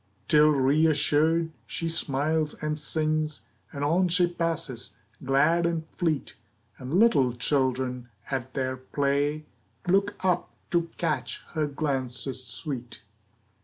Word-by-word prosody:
Till, 150 -1 +6
reassured, 155 +3 +3 0.2
she 165 - -3
smiles 155 0 0
and 150 0 -3
sings, 155 0 -1 0.3
And 140 - -4
on 175 +5 +3
she 175 +1 +4
passes, 165 -8 -3 0.3
glad 150 +6 +3
and 165 -1 -2
fleet, 160 -5 -1 0.5
And 130 +5 -4
little 160 - +4
children 125 0 -1 0.2
at 130 -1 -3
their 130 -1 -1
play 145 +3 0 0.4
Look 195 +3 +2
up 180 -2 +1 0.2
to 170 -1 +1
catch 130 -9 -1
her 155 -2 -1
glances 135 -3 -2
sweet. 125 0 -5
150 Hz, 115 wpm, -27 LUFS, 130-165 Hz, 0.5 s, Till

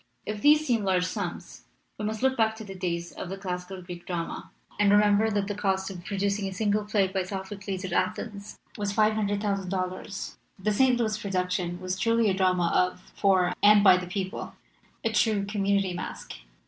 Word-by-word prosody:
If 210 -1 -4
these 300 +3 +5
seem 235 -6 +1
large 185 -2 +2
sums, - - -5 0.3
we 210 - -2
must 215 +2 -3
look 265 0 +3
back 220 -2 +2
to 220 - -8
the. 195 -2 -8
days 175 -2 -3
of 175 - -7
the 195 - -5
classic 180 -1 -5
Greek 175 -1 -8
drama 170 -2 -4 0.3
and 205 -1 +4
remember 205 +1 +4
that 205 -2 0
the 205 - -3
cost 195 -1 -1
of 180 -2 -9
producing 200 +1 -1
a 190 - -5
single 210 +1 0
play 210 -2 +2
by 190 0 -1
Sophocles 190 0 -5
at 185 - -4
Athens 200 +3 -2 0.2
was 205 -1 -1
$500,000. 200 -3 -1 0.2
"The 210 +2 0
St. 255 +3 +4
Louis 215 -2 0
production 180 -2 -2
was 185 0 -3
truly 230 -1 +3
a - - +1
drama 185 -2 +2
of, 180 0 +2 0.2
for, 185 -3 +3
and 205 0 +7
by 190 -3 +8
the 180 0 -3
people, 190 0 -4 0.5
a 225 - +1
true 210 -2 +2
community 200 -2 0
masque. 175 - -6
195 Hz, 185 wpm, -27 LUFS, 185-210 Hz, 0.5 s, by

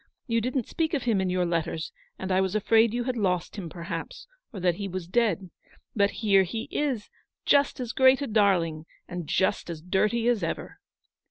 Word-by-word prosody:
You 230 -1 +1
didn't 250 0 -1
speak 325 -1 -1
of 270 - -2
him 220 -5 +2
in 190 - 0
your 180 0 +1
letters, 165 -1 -2 0.3
and 190 0 -4
I 185 +1 +3
was 190 +1 -1
afraid 220 +1 +4
you 240 +1 -1
had 255 0 -2
lost 180 -6 -1
him, 185 -6 -6
perhaps, 170 -1 -6 0.3
or 205 - -7
that 175 -1 +1
he 200 - -3
was 185 -2 -5
dead. 195 -4 0 0.4
But 200 -2 +3 0.2
here 195 -2 +6
he 205 +5 -3
is, 265 -8 -2 0.3
just 285 -1 +3
as 245 -2 -4
great 260 0 +5
a 285 - -2
darling, 180 - +1 0.2
and 175 -3 -6
just 190 +1 0
as 165 -2 -5
dirty 210 +7 +1
as 240 -4 +2
ever." 165 - -4
200 Hz, 195 wpm, -27 LUFS, 180-235 Hz, 0.4 s, here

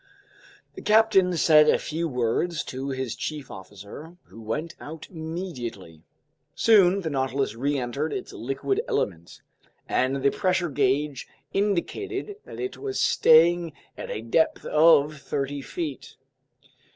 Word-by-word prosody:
The - - -9
captain 210 -5 +4
said 155 -1 +6
a - - +4
few 165 +2 -3
words 130 +6 -1
to 130 +2 -5
his 130 -3 -3
chief 150 -3 -5
officer 100 - -11
who 115 - -14
went 150 +10 -4
out 155 +1 -9
immediately. 160 - -6 0.5
Soon 200 -4 +5
the 165 - -3
Nautilus 135 -2 -1
reentered 140 +3 -2
its - - -5
liquid 135 - -2
element, 85 -3 -3 0.4
and 135 +1 0
the 140 - +4
pressure 185 -2 0
gauge 140 0 0 0.3
indicated 390 - -2
that - - -10
it 385 0 -4
was 405 -1 -3
staying 165 +1 +4 0.2
at - - -7
a 110 - -4
depth 140 +8 +1
of 150 -1 +4
thirty 140 +1 -3
feet. 150 -1 -6
150 Hz, 125 wpm, -25 LUFS, 130-175 Hz, 0.5 s, said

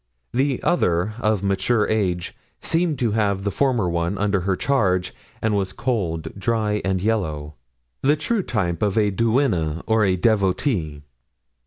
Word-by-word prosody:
The 135 +1 0
other, 95 - +1
of 110 -4 +1
mature 100 +3 +1
age, 90 -5 -1 0.2
seemed 165 -2 0
to 120 -3 0
have 100 -3 0
the 100 - -1
former 125 -5 +1
one 85 +3 -1
under 100 0 +1
her 95 +1 0
charge, 95 -8 +1 0.3
and 110 -1 +2
was 95 -2 -1
cold, 105 -10 -2
dry 105 0 0
and 95 -1 0
yellow—the 75 - -2
true 200 +8 -1
type 90 - -2
of 105 0 +1
a 105 -2 +3
duenna 95 - +1
or 110 -1 +2
a 95 -2 +3
devotee. 95 - 0
100 Hz, 145 wpm, -22 LUFS, 90-115 Hz, 0.3 s, a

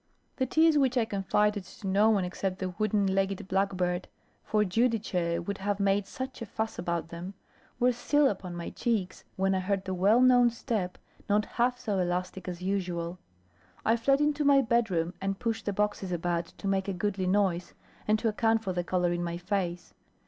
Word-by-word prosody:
The 260 - 0
tears, 315 +2 +4
which 260 -2 +2
I 235 - +3
confided 205 0 +1
to 190 - -13
no 200 +3 +4
one 200 -4 +2
except 185 +1 -3
the 185 -1 -3
wooden 210 +2 0
legged 195 0 0
blackbird 185 -2 0 0.4
for 215 -1 +2
Giudice 185 -6 0
would 200 +1 -4
have 200 +1 -1
made 200 0 +2
such 260 -1 -6
a 230 - -5
fuss 220 +2 -3
about 170 -1 -2
them 175 +4 -7 0.4
were 250 0 +4
still 290 +4 +2
upon 185 -6 -3
my 170 -1 -5
cheeks, 215 -6 -2
when 195 0 +1
I 190 - +1
heard 190 +1 -1
the 190 - -2
well 200 +6 +4
known 250 -1 +6
step 220 -6 -3 0.3
not 205 +1 +3
half 245 +1 0
so 215 -6 -2
elastic 180 +1 -2
as 180 0 -5
usual. 180 -2 -2 0.7
I 225 - +4
fled 275 +5 +2
into 295 0 +1
my 280 -1 +5
bedroom, 205 -8 +1
and 195 0 -1
pushed 225 0 -3
the - - +2
boxes 205 -2 -1
about, 170 -1 -1
to 200 - -8
make 195 0 0
a 195 - -1
goodly 190 0 -1
noise, 185 -2 +1 0.3
and 215 +1 +4
to 225 - -1
account 225 +1 +2
for 190 - -2
the 175 0 -1
colour 180 0 +1
in 175 0 -2
my 170 0 -3
face. 180 -1 -3
195 Hz, 190 wpm, -29 LUFS, 180-225 Hz, 0.7 s, known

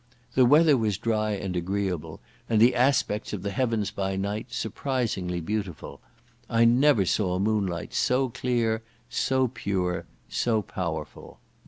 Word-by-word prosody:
The 130 -2 +5
weather 150 +1 +6
was 110 -5 0
dry 110 0 0
and 95 -2 -4
agreeable, 90 -1 -3 0.3
and 110 - +3
the 120 +3 +6
aspects 125 -5 +1
of 95 -3 -4
the 100 - -2
heavens 110 -2 0
by 95 -2 -2
night 100 +4 -3
surprisingly 110 -7 -2
beautiful. 90 -6 -4 0.5
I 115 0 +4
never 120 -3 +4
saw 90 -1 +1
moonlight 100 -4 -1
so 130 +1 +1
clear, 120 -2 0 0.3
so 130 +2 +1
pure, 90 -7 -2 0.2
so 110 -3 0
powerful. 80 -6 -5
105 Hz, 135 wpm, -26 LUFS, 95-120 Hz, 0.5 s, weather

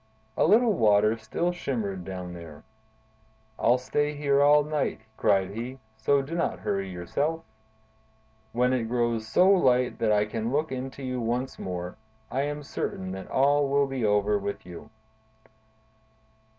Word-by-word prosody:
A - - +3
little 220 +4 +5
water 105 - +4
still 140 +10 -2
shimmered 110 - -3
down 90 -1 -6
there. 80 -4 -10 1.0
"I'll 125 - +4
stay 145 +4 -1
here 140 -1 +2
all 145 +1 +6
night," 150 -5 -2
cried 95 -2 +2
he, 120 +5 -6 0.2
"so 135 +6 +2
do 145 +5 -7
not 170 0 -1
hurry 100 -1 -2
yourself! 140 - -2 1.1
When 125 +2 +2
it 125 -3 0
grows 120 -2 0
so 180 +11 +4
light 130 -10 +3
that 110 -2 +2
I 105 0 +3
can 110 +2 -3
look 150 +2 0
into 130 +1 -5
you 125 -1 -3
once 125 +3 -2
more, 90 -1 -5 0.3
I 135 - 0
am 145 +1 -3
certain 95 -8 -4
that 95 0 -7
all 140 +1 +3
will 140 0 +3
be 135 -3 -3
over 105 0 +2
with 100 -1 -5
you." 90 -1 -10
125 Hz, 150 wpm, -27 LUFS, 105-140 Hz, 1.1 s, all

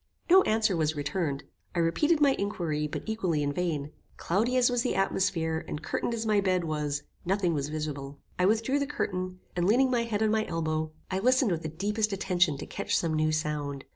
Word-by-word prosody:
No 380 +1 +9
answer 220 -3 +2
was 155 -1 0
returned. 145 -1 -2 0.3
I - - +1
repeated 295 - +2
my 285 -2 +5
inquiry, 165 -7 -1
but - - -5
equally 185 -9 0
in 145 0 -1
vain. 155 -4 -2 0.3
Cloudy 225 +8 +1
as 250 0 +4
was 245 -1 +1
the 250 - -1
atmosphere, 170 -4 0
and 150 - -5
curtained 235 +8 -2
as 225 0 -3
my 210 -2 +3
bed 185 -2 +1
was, 150 -2 -2 0.2
nothing 185 -1 +1
was 145 -1 -2
visible. 145 -2 -5 0.2
I 180 - +4
withdrew 225 +7 +2
the 280 - -1
curtain, 185 -10 -3
and 175 0 +1
leaning 255 +5 +4
my 240 -2 +2
head 220 -2 -1
on 215 - +2
my 220 0 +2
elbow, 155 -1 -1 0.2
I 190 - 0
listened 255 +1 +3
with 165 -2 -1
the 155 - -4
deepest 210 +6 -1
attention 180 -5 +1
to 140 - -6
catch - - -1
some 165 -2 0
new 155 0 +2
sound. 150 -3 -2
180 Hz, 205 wpm, -28 LUFS, 155-220 Hz, 0.3 s, No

